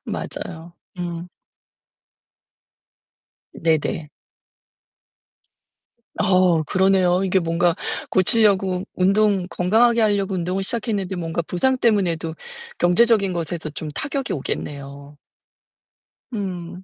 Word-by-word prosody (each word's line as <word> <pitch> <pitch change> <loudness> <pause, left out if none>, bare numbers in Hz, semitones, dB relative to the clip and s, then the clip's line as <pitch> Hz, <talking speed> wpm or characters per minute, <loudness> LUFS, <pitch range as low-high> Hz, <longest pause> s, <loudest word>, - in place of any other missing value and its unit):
맞아요. 170 0 -6 0.2
음. 175 0 -5 2.2
네네. 160 -1 -1 2.1
어 185 -3 +4
그러네요. 185 +2 +2
이게 190 0 +2
뭔가 170 0 +1 0.4
고치려고 190 -2 +2
운동 195 0 +2
건강하게 230 +6 +3
하려고 200 -3 +1
운동을 180 +2 -1
시작했는데 200 -3 -2
뭔가 170 -1 -2
부상때문에도 180 -5 +1 0.4
경제적인 200 +2 +3
것에서 165 -1 -3
좀 155 0 -5
타격이 275 - -3
오겠네요. 140 0 -6 1.1
음. 180 -4 -5
180 Hz, 215 characters per minute, -22 LUFS, 170-200 Hz, 2.2 s, 어